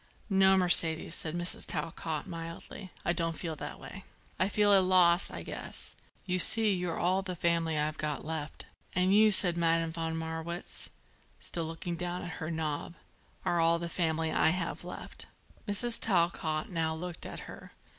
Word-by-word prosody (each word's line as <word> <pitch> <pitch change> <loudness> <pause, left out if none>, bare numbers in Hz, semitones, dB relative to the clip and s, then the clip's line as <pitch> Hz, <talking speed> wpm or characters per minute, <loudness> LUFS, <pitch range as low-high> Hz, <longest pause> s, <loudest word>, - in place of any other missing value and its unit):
"No, 190 0 +5
Mercedes," 165 -3 +4
said 160 -1 -3
Mrs. 175 0 0
Talcott 160 -2 -3
mildly; 165 +3 -8 0.2
"I 170 - +2
don't 165 -2 -2
feel 165 -3 -4
that 145 - -7
way. 195 - -9 0.4
I 185 - +2
feel 205 0 +3
it's 195 - +8
a - - +3
loss, 180 -1 +4
I - - -7
guess. - - -4 0.3
You 185 -1 0
see 220 +3 +3
you're 180 -2 -2
all 185 +2 +2
the 185 -2 -5
family 165 -1 +1
I've 150 +1 -1
got 150 -2 -3
left." 155 -1 -5 0.3
"And 185 +2 +3
you," 215 +1 +7
said 180 -4 +5
Madame 165 -1 +2
von 165 0 -3
Marwitz, 160 +2 -4 0.5
still 165 -2 -2
looking 165 +1 -5
down 180 +1 -3
at 175 -2 -6
her 160 - -3
knob, 160 0 -3 0.5
"are 175 - +1
all 165 0 +4
the 170 0 -4
family 160 -2 0
I - - +4
have 170 0 -2
left." - - -8 0.4
Mrs. 225 +3 +2
Talcott 170 -5 +1
now 160 -2 0
looked 175 +1 -6
at - - -7
her. - - -11
170 Hz, 175 wpm, -31 LUFS, 160-180 Hz, 0.5 s, it's